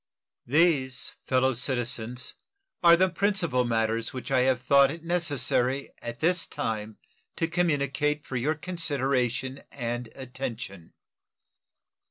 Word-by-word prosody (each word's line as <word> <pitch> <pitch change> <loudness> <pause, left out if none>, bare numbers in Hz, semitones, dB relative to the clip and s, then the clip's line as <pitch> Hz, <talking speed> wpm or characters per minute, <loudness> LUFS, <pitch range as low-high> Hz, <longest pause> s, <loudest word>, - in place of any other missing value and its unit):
These, 140 -3 +2
fellow 130 0 +3
citizens, 120 0 -2 0.5
are 170 -1 +7
the 185 +2 +4
principal 180 -8 +1
matters 115 0 0
which 130 +1 -6
I 130 - +4
have 130 0 +3
thought 140 +2 +5
it 160 +3 -7
necessary 145 -6 0
at 120 0 -7
this 175 +1 +2
time 110 -1 -4 0.4
to 165 - 0
communicate 150 -3 0
for 130 - -6
your 140 +6 +1
consideration 135 -6 -1
and 120 -2 -4
attention. 125 -9 -6
130 Hz, 115 wpm, -27 LUFS, 120-155 Hz, 0.5 s, are